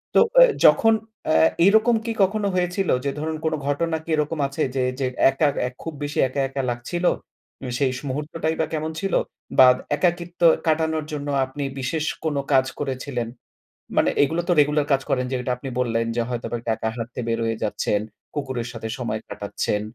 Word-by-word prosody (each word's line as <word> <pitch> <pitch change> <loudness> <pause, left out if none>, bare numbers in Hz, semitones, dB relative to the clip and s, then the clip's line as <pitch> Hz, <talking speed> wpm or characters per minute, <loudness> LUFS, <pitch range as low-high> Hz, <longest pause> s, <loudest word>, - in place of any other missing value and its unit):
তো - - +8 0.2
এ্যা - - +11 0.2
যখন 225 0 +6 0.4
আ - - +4 0.3
এরকম 220 +4 +5
কি 230 - -1
কখনো 200 +2 +1
হয়েছিল? 180 +1 0 0.2
যে 140 - +1
ধরুন 155 +1 -2
কোনো 155 0 +1
ঘটনা 160 +3 0
কি - - -14
এরকম 150 +1 -1
আছে? 140 +3 -5
যে, 130 - +1 0.2
যে 135 - 0 0.3
একা, 140 +3 +2 0.2
এক 125 - -8
খুব 165 - -5
বেশি 145 +1 -3
একা, 135 +2 -2
একা 135 0 -2
লাগছিল, 170 +9 -3 0.6
উ - - -4
সেই 135 -2 +2
স - - -6
মুহূর্তটাই 155 +4 -2
বা - - +2
কেমন 155 0 -2
ছিল 195 -1 -2 0.4
বা 130 - +9 0.3
একাকিত্ব 175 +2 -1 0.3
কাটানোর 160 -1 +1
জন্য 145 -1 -4 0.2
আপনি 130 +2 -6 0.2
বিশেষ 150 +4 -1 0.2
কোনো 150 -3 0
কাজ 130 -1 +5
করেছিলেন? 130 -3 -3 0.7
মানে - - +4
এগুলো 160 +5 0
তো - - +2
রেগুলার 150 0 +3
কাজ 135 -1 +3
করেন 130 -1 +1
যেটা 125 -1 -1
আপনি 135 +2 -6
বললেন 115 -2 0
যে, 120 - +1
হয়তোবা 120 -1 -3 0.2
একা 110 - -2
হাঁটতে 120 +1 -6
বের 115 0 0
হয়ে 115 -1 -1
যাচ্ছেন, 105 0 0 0.3
কুকুরের 130 -5 -3
সাথে 115 -1 -6
সময় 115 -4 -3
কাটাচ্ছেন 105 0 -2
145 Hz, 180 wpm, -23 LUFS, 125-160 Hz, 0.7 s, এ্যা